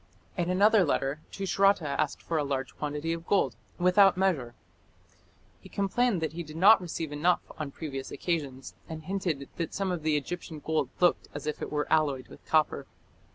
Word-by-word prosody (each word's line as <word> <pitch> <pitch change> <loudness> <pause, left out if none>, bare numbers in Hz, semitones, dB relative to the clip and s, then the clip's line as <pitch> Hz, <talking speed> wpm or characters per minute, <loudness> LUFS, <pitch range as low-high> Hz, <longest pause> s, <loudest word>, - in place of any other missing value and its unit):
In 175 -2 -1
another 200 +3 +5
letter 140 -2 0
Tushratta 195 -3 +2
asked 140 0 -1
for 165 -2 -1
a - - +1
large 135 -2 -3
quantity 150 +2 -2
of 165 0 -7
gold 135 - +2 0.2
"without 180 +1 +5
measure". 155 -11 0 1.0
He - - -14
complained 200 0 +1
that 160 - -2
he 170 - -4
did 155 -1 -9
not 195 +4 +7
receive 165 -3 -4
enough 165 +5 +2 0.2
on 155 -2 -3
previous 135 -2 -6
occasions, 140 -7 -3 0.2
and 160 -1 -6
hinted 175 -7 -2
that 165 -2 -3
some 195 -1 -1
of 175 -3 -2
the 155 -1 +2
Egyptian 165 +2 -5
gold 155 -3 -1
looked 175 -1 +3
as 145 - -5
if 150 - -3
it - - -4
were 150 -1 0
alloyed 140 -6 +1
with - - -14
copper. 155 -2 +2
160 Hz, 180 wpm, -29 LUFS, 145-180 Hz, 1.0 s, not